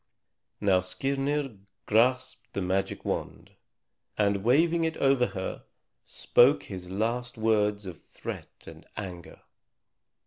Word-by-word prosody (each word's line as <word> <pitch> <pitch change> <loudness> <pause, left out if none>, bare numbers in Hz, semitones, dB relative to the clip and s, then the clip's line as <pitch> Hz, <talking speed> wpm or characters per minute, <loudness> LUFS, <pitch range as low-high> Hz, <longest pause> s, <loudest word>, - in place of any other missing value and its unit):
Now 95 -3 +4
Skirnir 135 +5 -2 0.3
grasped 125 +2 +1
the 100 - -2
magic 95 +2 -1
wand, - - -4 0.7
and 100 -2 +2
waving 165 +8 +4
it 160 0 -1
over 135 -3 +3
her, 95 -2 -5 0.4
spoke 140 +4 +4
his 90 -3 -7
last 120 +6 -1
words 105 -2 +1
of 90 -4 -8
threat - - -8
and - - -12
anger. 90 -5 -7
110 Hz, 110 wpm, -28 LUFS, 95-135 Hz, 0.7 s, Now